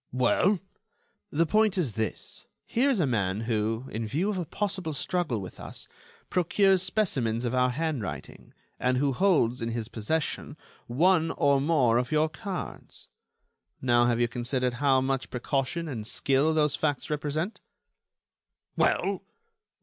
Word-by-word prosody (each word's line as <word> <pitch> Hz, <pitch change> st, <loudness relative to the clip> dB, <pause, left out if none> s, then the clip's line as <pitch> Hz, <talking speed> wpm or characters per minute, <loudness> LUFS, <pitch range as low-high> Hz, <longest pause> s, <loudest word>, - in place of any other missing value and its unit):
"Well?" 130 Hz, -, +3 dB, 0.7 s
"The 165 Hz, +3 st, +2 dB
point 215 Hz, +3 st, +3 dB
is 150 Hz, -, +1 dB
this: 110 Hz, +1 st, -4 dB, 0.2 s
here 260 Hz, +5 st, +2 dB
is 255 Hz, -7 st, +2 dB
a 165 Hz, -, +3 dB
man 105 Hz, -5 st, 0 dB
who, 110 Hz, +1 st, -1 dB
in 110 Hz, +1 st, -3 dB
view 170 Hz, -, 0 dB
of 195 Hz, -, -2 dB
a 175 Hz, -, -4 dB
possible 190 Hz, -5 st, -2 dB
struggle 150 Hz, -4 st, -1 dB
with 95 Hz, -2 st, -9 dB
us, -, -, -7 dB, 0.4 s
procures 190 Hz, +2 st, +3 dB
specimens 135 Hz, -, 0 dB
of 120 Hz, -, -1 dB
our 125 Hz, 0 st, +3 dB
handwriting, 140 Hz, -, -4 dB, 0.2 s
and 125 Hz, 0 st, +1 dB
who 140 Hz, +1 st, +1 dB
holds, 130 Hz, -8 st, +2 dB
in 115 Hz, -, -1 dB
his 115 Hz, -1 st, -3 dB
possession, 150 Hz, +6 st, -2 dB, 0.3 s
one 165 Hz, +6 st, +3 dB
or 140 Hz, -1 st, +2 dB
more 135 Hz, -7 st, +3 dB
of 125 Hz, 0 st, -3 dB
your 155 Hz, +1 st, +3 dB
cards. 195 Hz, +2 st, -6 dB, 0.7 s
Now, 120 Hz, -1 st, +3 dB
have 120 Hz, -1 st, +1 dB
you 120 Hz, -, +3 dB
considered 125 Hz, +1 st, -1 dB
how 135 Hz, -2 st, +4 dB
much 135 Hz, 0 st, -1 dB
precaution 135 Hz, +6 st, -2 dB
and 115 Hz, -7 st, -4 dB
skill 140 Hz, +6 st, +2 dB
those 150 Hz, -1 st, +3 dB
facts 145 Hz, -1 st, -1 dB
represent?" 150 Hz, +6 st, -2 dB, 1.2 s
"Well?" 195 Hz, -1 st, +1 dB
140 Hz, 145 wpm, -28 LUFS, 120-170 Hz, 1.2 s, how